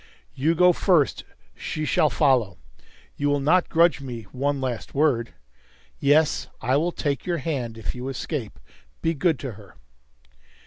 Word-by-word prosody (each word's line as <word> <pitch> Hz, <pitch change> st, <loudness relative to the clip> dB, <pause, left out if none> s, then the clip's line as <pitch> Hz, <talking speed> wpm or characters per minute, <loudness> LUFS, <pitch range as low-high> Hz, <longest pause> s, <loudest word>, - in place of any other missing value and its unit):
"You 150 Hz, +5 st, +1 dB
go 180 Hz, +1 st, +5 dB
first. 170 Hz, -6 st, +2 dB, 0.3 s
She 155 Hz, -, -4 dB
shall 150 Hz, -, +3 dB
follow. 125 Hz, -, +2 dB, 0.6 s
You 145 Hz, 0 st, 0 dB
will 145 Hz, 0 st, +2 dB
not 160 Hz, +6 st, +2 dB
grudge 170 Hz, -2 st, +3 dB
me 120 Hz, -4 st, -6 dB
one 140 Hz, +2 st, -1 dB
last 125 Hz, -2 st, -4 dB
word? 135 Hz, -6 st, +1 dB, 0.6 s
Yes, 150 Hz, +2 st, +3 dB
I 130 Hz, -, +1 dB
will 165 Hz, +5 st, +1 dB
take 145 Hz, -2 st, -3 dB
your 175 Hz, -1 st, 0 dB
hand. 130 Hz, -7 st, -3 dB
If 110 Hz, -, -4 dB
you 125 Hz, +1 st, -6 dB
escape 135 Hz, -4 st, -5 dB, 0.4 s
be 165 Hz, -, +2 dB
good 165 Hz, 0 st, +1 dB
to 135 Hz, -, -4 dB
her!" 100 Hz, -3 st, -15 dB
145 Hz, 150 wpm, -24 LUFS, 125-160 Hz, 0.6 s, go